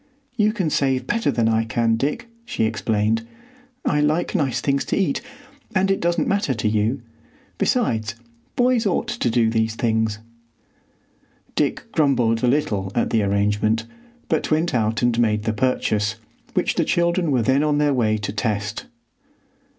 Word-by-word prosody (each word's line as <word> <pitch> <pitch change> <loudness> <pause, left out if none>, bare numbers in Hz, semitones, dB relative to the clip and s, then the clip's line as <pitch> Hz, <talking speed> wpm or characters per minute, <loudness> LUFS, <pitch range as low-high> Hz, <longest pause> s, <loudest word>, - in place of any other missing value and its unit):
"You 215 -2 +3
can 190 -8 -1
save 130 -2 +1
better 230 - 0
than 115 -2 +1
I 115 0 +2
can, 115 +1 +1
Dick," 140 - -2 0.2
she 235 - -2
explained; 110 0 0 0.6
"I 150 - +2
like 155 +4 +1
nice 145 - 0
things 140 -1 0
to - - -1
eat, 200 +7 0 0.5
and 190 +1 +3
it 195 - +1
doesn't 170 0 0
matter 195 -10 +1
to 110 0 -1
you. 110 +4 0 0.6
Besides, 115 - 0 0.4
boys 245 -3 +2
ought 215 +5 0
to 235 - -1
do 115 -1 +2
these 110 0 0
things." 110 -2 0 1.4
Dick - - -1
grumbled 120 -7 +2
a - - +4
little 105 -8 0
at 120 - 0
the 110 - +3
arrangement, 105 +3 +1 0.4
but 160 - 0
went 160 +3 +1
out 110 -1 0
and 120 -1 +2
made 105 -3 +2
the 110 0 0
purchase, 110 -3 0 0.4
which - - +1
the - - +1
children 170 0 +1
were 130 -5 +2
then 130 +5 +3
on 150 -1 +1
their 145 -1 +2
way 110 -4 +1
to 100 -1 -4
test. 105 -2 -2
120 Hz, 160 wpm, -22 LUFS, 110-155 Hz, 1.4 s, a